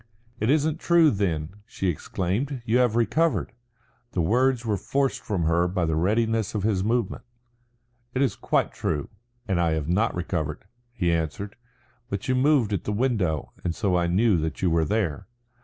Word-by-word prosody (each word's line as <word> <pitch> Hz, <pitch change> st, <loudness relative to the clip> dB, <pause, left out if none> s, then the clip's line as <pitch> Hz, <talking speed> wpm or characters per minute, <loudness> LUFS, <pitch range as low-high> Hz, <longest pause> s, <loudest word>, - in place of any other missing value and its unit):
"It 110 Hz, -, 0 dB
isn't 155 Hz, +2 st, +2 dB
true, 170 Hz, -3 st, +5 dB
then," 95 Hz, -3 st, -2 dB
she 95 Hz, -, -3 dB
exclaimed. 100 Hz, -, -2 dB
"You 120 Hz, +2 st, +3 dB
have 120 Hz, -3 st, +3 dB
recovered." 120 Hz, -, +1 dB, 0.6 s
The 90 Hz, -, +1 dB
words 125 Hz, +6 st, +2 dB
were 110 Hz, -2 st, +1 dB
forced 135 Hz, +8 st, -1 dB
from 95 Hz, -6 st, -2 dB
her 85 Hz, +2 st, +2 dB
by 90 Hz, -1 st, 0 dB
the 80 Hz, -1 st, 0 dB
readiness 110 Hz, +5 st, +1 dB
of 105 Hz, -, -1 dB
his 100 Hz, -3 st, +1 dB
movement. 115 Hz, -1 st, 0 dB, 0.9 s
"It 130 Hz, -, +3 dB
is 135 Hz, -, 0 dB
quite -, -, 0 dB
true, 75 Hz, -3 st, -2 dB, 0.4 s
and 95 Hz, -3 st, +1 dB
I 85 Hz, -2 st, +2 dB
have 80 Hz, -2 st, -2 dB
not 105 Hz, +7 st, +1 dB
recovered," 85 Hz, -3 st, -3 dB, 0.3 s
he 90 Hz, -8 st, 0 dB
answered. 85 Hz, +5 st, -3 dB, 0.5 s
"But 100 Hz, -1 st, -4 dB
you 130 Hz, -, +2 dB
moved 130 Hz, -4 st, +3 dB
at 95 Hz, -, -2 dB
the -, -, -1 dB
window 105 Hz, -, 0 dB
and 85 Hz, -2 st, -1 dB
so 100 Hz, -5 st, +1 dB
I 85 Hz, -1 st, +2 dB
knew 100 Hz, +3 st, +3 dB
that 80 Hz, +4 st, -3 dB
you 90 Hz, -, +3 dB
were 80 Hz, -1 st, +2 dB
there." 95 Hz, -3 st, -1 dB
100 Hz, 175 wpm, -25 LUFS, 85-120 Hz, 0.9 s, true